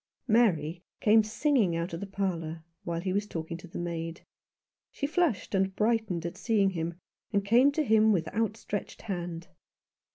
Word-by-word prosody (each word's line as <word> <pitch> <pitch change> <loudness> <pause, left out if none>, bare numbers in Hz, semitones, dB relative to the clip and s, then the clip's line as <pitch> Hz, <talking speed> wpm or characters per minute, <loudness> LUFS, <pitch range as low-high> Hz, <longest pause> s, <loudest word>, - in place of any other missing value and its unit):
Mary 175 -8 +3 0.2
came 220 +1 +6
singing 220 - +2
out 170 +1 -2
of 165 - -3
the 200 - -5
parlour, 170 -5 -3 0.2
while 170 -1 -2
he 185 0 -1
was 205 +1 0
talking 165 -2 -5
to 175 +2 -10
the 165 - -8
maid. 170 -1 -4 0.7
She 280 - -3
flushed 305 - 0
and 190 0 +1
brightened 215 -6 +1
at 170 - -4
seeing 205 -4 +2
him, 170 -1 -3 0.4
and 200 -2 +1
came 245 +7 +5
to 310 - +1
him 220 -3 +5
with 170 -6 +1
outstretched 215 -2 -3
hand. 175 -5 -4
195 Hz, 165 wpm, -29 LUFS, 170-220 Hz, 0.7 s, came